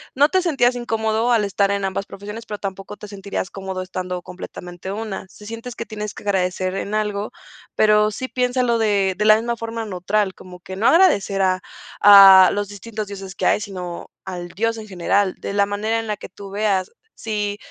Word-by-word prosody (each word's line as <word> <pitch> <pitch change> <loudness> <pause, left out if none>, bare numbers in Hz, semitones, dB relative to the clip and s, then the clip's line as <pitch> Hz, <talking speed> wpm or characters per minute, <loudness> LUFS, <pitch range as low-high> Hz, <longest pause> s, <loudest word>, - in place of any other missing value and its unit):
no 285 +3 +5
te 375 +2 +2
sentías 270 -8 +2
incómodo 225 0 0
al 225 -3 +3
estar 200 0 +1
en 200 0 -1
ambas 195 +1 -2
profesiones, 210 +4 -9
pero 210 -2 -5
tampoco 195 0 -6
te 210 - -11
sentirías 195 -1 -5
cómodo 190 -1 -5
estando 180 -1 -4
completamente 180 0 -8
una. 210 -3 -5
Si 210 +2 -15
sientes 230 +2 -7
que 230 - -5
tienes 210 -1 -6
que - - -11
agradecer 185 -2 0
en 200 +1 -4
algo, 210 -1 -2 0.4
pero 210 0 +4
sí 260 +5 -5
piénsalo 250 -1 +1
de 200 -4 +2
de 210 - 0
la 215 0 +8
misma 235 +2 -2
forma 230 0 -4
neutral, 195 +1 -1
como 180 -1 -13
que 190 +1 -8
no 220 - +2
agradecer 200 - +4
a 185 -1 +2 0.4
a 195 -2 +10
los 205 -1 -2
distintos 210 +1 -6
dioses 195 -1 -8
que - - -3
hay, - - +4
sino 185 -4 -7
al 180 -2 -6
Dios 230 +5 -1
en 220 -1 -8
general, 190 +1 0
de - - -5
la 200 0 +2
manera 210 +3 -1
en 225 - -5
la 210 - -1
que - - -10
tú 200 +1 -11
veas 200 -2 0 0.3
si, 210 -2 -2
205 Hz, 200 wpm, -21 LUFS, 190-220 Hz, 0.4 s, a